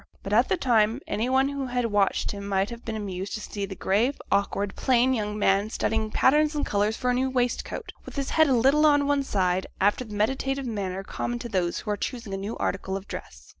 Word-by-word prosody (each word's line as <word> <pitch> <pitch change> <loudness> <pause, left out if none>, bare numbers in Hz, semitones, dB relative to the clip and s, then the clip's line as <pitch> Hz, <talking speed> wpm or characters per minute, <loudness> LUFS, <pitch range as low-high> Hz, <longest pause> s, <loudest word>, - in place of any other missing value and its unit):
But, 200 - -3
at 235 +4 +4
the 380 - +2
time, 230 -4 +2
any 220 +4 -1
one 265 +1 +3
who 280 -2 -3
had 245 -1 -1
watched 205 -3 +1
him 200 -1 -6
might 195 +2 0
have 235 0 -8
been 225 - -4
amused 195 -2 -4
to - - -4
see 200 -1 -5
the 190 - -7
grave, 220 +10 +1
awkward, 200 0 0
plain 255 0 +3
young 210 -3 -2
man 200 0 +2
studying 220 -1 -1
patterns 300 +7 +3
and 295 - 0
colours 210 +2 0
for 250 -1 0
a - - +1
new 260 +2 +1
waistcoat, 250 -2 -2
with - - -10
his 275 -2 -2
head 315 -1 +5
a 270 - +3
little 275 +6 +4
on 290 -1 +4
one 285 0 +2
side, 190 -7 0
after 205 +5 +2
the 215 -3 -9
meditative 265 +5 0
manner 195 -5 -3
common 240 +4 -3
to 240 0 -6
those 180 -4 0
who 210 - -3
are 205 - -1
choosing 230 -5 -5
a - - -2
new 200 +4 -5
article 190 0 -2
of 195 - -10
dress. - - -9
220 Hz, 235 wpm, -26 LUFS, 200-260 Hz, -, head